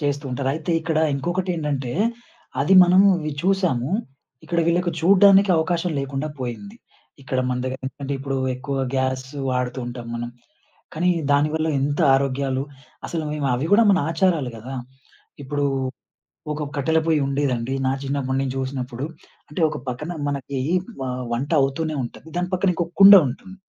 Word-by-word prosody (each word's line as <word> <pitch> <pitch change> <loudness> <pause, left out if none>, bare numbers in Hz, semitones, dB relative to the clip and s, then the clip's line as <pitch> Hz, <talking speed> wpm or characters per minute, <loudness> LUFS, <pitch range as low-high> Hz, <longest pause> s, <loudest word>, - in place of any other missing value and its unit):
చేస్తూ 145 0 -1
ఉంటారు. 130 +1 -2
అయితే 160 +2 -4
ఇక్కడ 160 -1 -1 0.2
ఇంకొకటేంటంటే, 150 -5 -2 0.7
అది 165 +7 +4
మనము 185 +3 +5
అవి 155 -2 -4
చూసాము. 180 -9 +1 0.5
ఇక్కడ 170 -1 -2
వీళ్ళకి 175 +1 +1
చూడ్డానికి 195 +2 +6
అవకాశం 170 +2 0
లేకుండా 140 +2 -3
పోయింది. 165 - -6 0.5
ఇక్కడ 130 -1 -2
మన 125 0 -1
దగ్గరెందుకంటే 130 +2 -5
ఇప్పుడు 135 0 -3 0.2
ఎక్కువ 135 +2 -4 0.2
గ్యాసు 130 +1 -2
వాడుతూ 125 0 -2
ఉంటాం 120 -1 -7
మనం. 120 0 -4 0.6
కానీ, 180 +3 +2 0.2
దానివల్ల 155 +2 +1
ఎంత 145 +3 -1
ఆరోగ్యాలు, 135 0 0 0.5
అసలు 160 -2 -3
మేమవి 140 -1 -1
గూడా 230 +3 +7
మన 190 - +4
ఆచారాలు 165 -6 +1
గదా! 125 +5 -8 0.7
ఇప్పుడు 145 +1 -2 0.9
ఒక 150 0 -4
కట్టెల 160 +3 +2
పొయ్యుండేదండి. 140 -4 0
నా 130 - +2
చిన్నప్పుడు 135 -1 -2
నేను 135 -1 -2
జూసినప్పుడు. 130 -1 -4 0.4
అంటే 150 +4 -6
ఒక - - -5
పక్కన 150 +8 -4 0.2
మనకి 140 -1 -3 0.4
వ 130 - -2 0.3
వంట 130 +5 -2
అవుతూనే 155 +3 -1
ఉంటది. 160 - -10
దాని 180 +1 -1
పక్కనింకో 180 -2 +1 0.2
కుండ 195 +1 +11
ఉంటుంది. 190 +9 -9
145 Hz, 135 wpm, -22 LUFS, 130-170 Hz, 0.9 s, కుండ